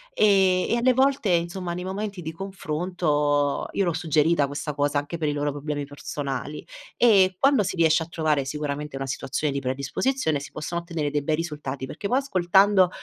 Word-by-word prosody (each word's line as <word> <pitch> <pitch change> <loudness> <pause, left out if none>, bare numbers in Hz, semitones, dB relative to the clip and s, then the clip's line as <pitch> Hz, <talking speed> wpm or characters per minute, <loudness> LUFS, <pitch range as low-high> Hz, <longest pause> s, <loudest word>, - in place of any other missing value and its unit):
Ehm, 190 -3 +3
e - - +3
alle 250 +2 +3
volte, 265 -4 +2
insomma 175 0 -1
nei 180 - -5
momenti 195 0 -4
di 160 - -4
confronto 155 -5 -1
io 195 - +1
l'ho 175 - 0
suggerita 155 -1 +2
questa 145 +2 -4
cosa 145 0 0
anche 145 +4 -3
per 155 - 0
i - - +1
loro 145 0 -1
problemi 145 0 -4
personali, 145 0 -5 0.3
e 195 -6 +5
quando 275 +1 +4
si 195 -1 -2
riesce 165 -1 +3
a 160 - -4
trovare 155 -4 0
sicuramente 150 0 -4
una 135 0 -3
situazione 135 +2 -2
di 140 - -1
predisposizione 140 - -1
si 140 - -9
possono 170 +3 -4
ottenere 165 -4 -3
dei 145 - 0
bei 155 +2 0
risultati 150 -5 -4
perché 200 - -5
poi 250 - +2
ascoltando, 195 -5 +4
160 Hz, 185 wpm, -25 LUFS, 145-190 Hz, 0.3 s, e